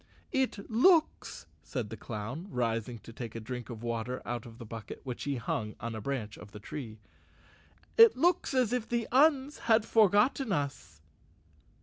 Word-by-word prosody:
"It 260 -8 -1
looks," 315 +8 +3 0.2
said 120 -7 -4
the - - -4
clown, 120 - -6
rising 115 - -1
to 115 - -12
take 115 -3 -7
a - - -3
drink 125 +2 -6
of 115 -2 -7
water 120 +2 -2
out 120 -1 -4
of 115 -1 -12
the 120 - -9
bucket, 110 0 -8
which 125 -3 -5
he 140 -1 -1
hung 110 -3 -3
on 115 +1 -4
a 110 - -5
branch 115 -3 -4
of 105 -1 -12
the 105 - -8
tree, 110 0 -7 1.0
"it 455 - +8
looks 340 -1 +2
as 250 -3 +2
if 245 -3 -1
the 235 -1 0
Uns 280 +1 +4
had 220 -1 +5
forgotten 220 +4 +3
us." 135 - -3
130 Hz, 175 wpm, -31 LUFS, -, 1.0 s, it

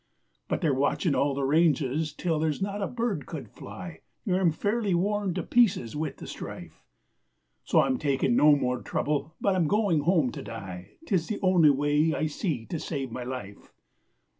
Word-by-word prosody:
But - - -2
they're 155 -6 +2
watching 145 +4 +1
all 140 0 +1
the 140 - -2
ranges 150 0 +2
till 160 +2 -1
there's 155 -2 0
not 200 +1 -3
a 195 - 0
bird 235 -3 -2
could - - -6
fly, - - -9 0.3
And 185 -4 +1
I'm 185 -3 +3
fairly 205 +3 0
worn 200 0 0
to 185 - -2
pieces 195 - +2
with 155 0 -3
the - - -9
strife, - - -9 0.8
So - - +4
I'm 130 -2 0
taking 135 -4 +1
no 150 +2 +6
more 125 -3 -1
trouble, 150 +2 -2
but 200 -2 +1
I'm 175 -4 +2
going 200 -4 +2
home 155 -4 +2
to - - -7
die, 95 -5 -8
'Tis 185 - 0
the 215 - -2
only 180 -5 +5
way 145 +3 +2
I - - 0
see 150 - -2
to 165 - -4
save 135 -6 -4
my 125 - -5
life. 120 -6 -7
155 Hz, 185 wpm, -27 LUFS, 135-185 Hz, 0.8 s, no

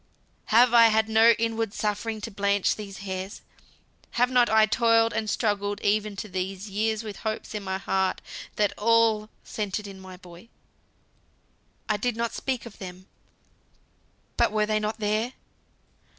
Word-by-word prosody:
"Have 240 +2 +5
I 230 -1 +8
had 220 0 +2
no 225 +1 +6
inward 225 -2 -1
suffering 215 +1 -2
to 225 - -6
blanch 200 0 +1
these 200 -2 -8
hairs? 190 +1 -5 0.7
Have 245 +1 +3
not 245 -1 +4
I 220 0 +5
toiled 230 0 +3
and 215 -1 -2
struggled 205 -2 -1
even 210 0 0
to 195 - -6
these 190 +1 -4
years 220 +2 -1
with 210 -3 -7
hopes 220 -1 -4
in 210 - -3
my 190 -1 -3
heart 190 -1 0 0.4
that 210 -1 +1
all 225 -1 +3
centered 210 0 -4
in 195 -1 -9
my 185 -1 -11
boy? 180 +4 -15 1.4
I 215 - +1
did 240 +2 -2
not 235 0 -2
speak 260 -3 -3
of 235 - -12
them, 185 -1 -9 1.3
but - - +3
were 215 0 +1
they 215 0 0
not 215 +1 -3
there? 215 +4 -1
215 Hz, 155 wpm, -26 LUFS, 200-225 Hz, 1.4 s, I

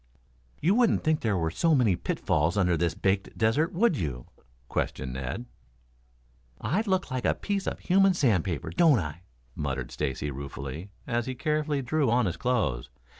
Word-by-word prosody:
"You 175 +6 +3
wouldn't 235 -1 +3
think 155 -1 +2
there 105 -4 +1
were 80 -2 0
so 165 - +2
many 115 -9 +3
pitfalls 85 +1 0
under 90 -3 +3
this 85 +1 0
baked 95 0 -1
desert, 120 +10 +2
would 200 +1 +2
you?" 65 - -3 0.4
questioned 65 +1 -2
Ned. 65 - -4 1.1
"I 150 - 0
look 190 -6 0
like 130 -1 -2
a - - +2
piece 200 -2 -2
of - - -2
human 195 0 +4
sandpaper, 95 - +1
don't 165 -7 +5
I?" 80 -3 -4 0.3
muttered 65 -4 -3
Stacy 75 0 -2
ruefully, 70 +5 -6 0.2
as 120 -2 -1
he 130 - -3
carefully 150 -1 0
drew 145 +1 +1
on 120 0 +3
his 90 -3 -1
clothes. 110 - -1
110 Hz, 165 wpm, -28 LUFS, -, 1.1 s, don't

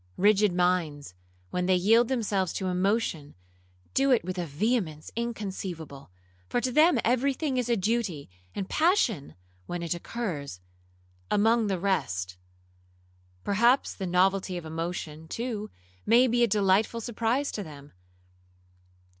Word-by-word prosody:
Rigid 205 +1 +4
minds, 175 - 0 0.4
when 180 0 -1
they 185 - +4
yield 225 +6 +4
themselves 205 -8 0
to 190 - -3
emotion, 185 -5 -1 0.6
do 275 +1 +3
it 250 -3 +4
with 185 0 -4
a 175 - -2
vehemence 160 - -1
inconceivable, 190 - -5 0.4
for - - +1
to 250 +2 -1
them 305 +2 +5
every 255 +3 +2
thing 275 -3 -2
is 245 -1 -1
a 235 - +2
duty, 200 -7 -1 0.3
and 195 - -3
passion 240 - +1 0.3
(when 175 -1 -4
it 170 - -1
occurs) 170 - -5 0.7
among 225 +2 +3
the 195 -2 0
rest. 95 - -1 1.1
Perhaps 235 +6 +3
the 190 - -5
novelty 185 +1 +2
of 175 - -7
emotion, 160 -1 -5
too, 220 +1 -4 0.3
may 235 +3 +5
be 240 -1 +1
a - - +5
delightful 205 +2 +2
surprise 235 +4 -1
to 210 - -4
them. 145 -5 -11
195 Hz, 135 wpm, -27 LUFS, 175-235 Hz, 1.1 s, them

